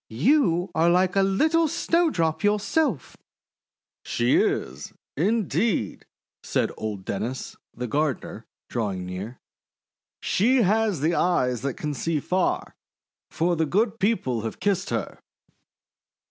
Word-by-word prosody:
You 180 Hz, -, +2 dB
are 165 Hz, +2 st, +3 dB
like 180 Hz, +2 st, +2 dB
a 195 Hz, -, +4 dB
little 315 Hz, +13 st, +2 dB
Snowdrop 290 Hz, -, +1 dB
yourself!' 210 Hz, -, 0 dB, 0.9 s
:<She 120 Hz, +1 st, +1 dB
is, 65 Hz, +4 st, -1 dB, 0.2 s
indeed," 205 Hz, -, 0 dB, 0.3 s
said -, -, -1 dB
old 105 Hz, -3 st, -5 dB
Dennis, 115 Hz, +7 st, -4 dB, 0.2 s
the 125 Hz, -, -4 dB
gardener, 130 Hz, -4 st, -2 dB, 0.2 s
drawing 100 Hz, -6 st, -3 dB
near. 95 Hz, +7 st, -6 dB, 0.8 s
:<She 245 Hz, +5 st, +2 dB
has 205 Hz, -6 st, +1 dB
eyes 160 Hz, -8 st, +1 dB
that 135 Hz, -1 st, -2 dB
can 150 Hz, -1 st, -3 dB
see 160 Hz, +2 st, -1 dB
far! 180 Hz, +5 st, -1 dB, 0.6 s
For 175 Hz, +2 st, 0 dB
the 160 Hz, -1 st, 0 dB
Good 215 Hz, +6 st, 0 dB
People 180 Hz, -, 0 dB
have 115 Hz, -, -5 dB
kissed 195 Hz, -1 st, 0 dB
her!' -, -, -3 dB
170 Hz, 115 wpm, -25 LUFS, 125-205 Hz, 0.9 s, a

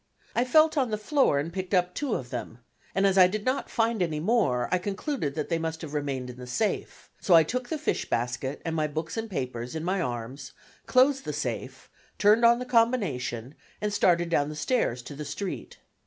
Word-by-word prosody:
I 240 Hz, -, +2 dB
felt 310 Hz, +3 st, +4 dB
on 255 Hz, -3 st, +1 dB
the 215 Hz, -, -1 dB
floor 240 Hz, -, +2 dB
and 155 Hz, +4 st, -2 dB
picked 190 Hz, 0 st, -2 dB
up 180 Hz, 0 st, +2 dB
two 285 Hz, -6 st, -1 dB
of 125 Hz, -2 st, -5 dB
them, 120 Hz, -1 st, -5 dB, 0.4 s
and 195 Hz, +1 st, +3 dB
as 195 Hz, -1 st, +4 dB
I 180 Hz, -, +9 dB
did 210 Hz, +3 st, -4 dB
not 255 Hz, +2 st, 0 dB
find 225 Hz, -2 st, 0 dB
any 160 Hz, -4 st, 0 dB
more 155 Hz, -, +1 dB
I 185 Hz, -, +3 dB
concluded 195 Hz, -, -3 dB
that 155 Hz, -, -3 dB
they 165 Hz, -1 st, +1 dB
must 160 Hz, 0 st, -4 dB
have 150 Hz, -2 st, -7 dB
remained 135 Hz, -4 st, -3 dB
in 125 Hz, -, -14 dB
the 125 Hz, 0 st, -9 dB
safe; 205 Hz, -, -2 dB
so 180 Hz, -, +5 dB
I 165 Hz, -, +8 dB
took 250 Hz, +9 st, -3 dB
the 320 Hz, -, -1 dB
fish 305 Hz, -, -2 dB
basket 120 Hz, +4 st, -2 dB
and 165 Hz, -1 st, -2 dB
my 155 Hz, -1 st, +1 dB
books 155 Hz, +2 st, -4 dB
and 225 Hz, 0 st, -3 dB
papers 125 Hz, -, -4 dB
in 160 Hz, -, -3 dB
my 185 Hz, +2 st, 0 dB
arms, 125 Hz, 0 st, -5 dB, 0.3 s
closed 270 Hz, +1 st, +4 dB
the -, -, -4 dB
safe, -, -, -4 dB, 0.3 s
turned 210 Hz, +3 st, +5 dB
on 235 Hz, 0 st, +7 dB
the 250 Hz, -, -5 dB
combination, 190 Hz, -, 0 dB, 0.3 s
and 210 Hz, -1 st, -2 dB
started 175 Hz, -3 st, +3 dB
down 145 Hz, -3 st, +1 dB
the 155 Hz, -, -6 dB
stairs 150 Hz, -, 0 dB
to 145 Hz, -, -8 dB
the 150 Hz, -, -5 dB
street. 165 Hz, +7 st, -5 dB
175 Hz, 215 wpm, -27 LUFS, 140-225 Hz, 0.4 s, I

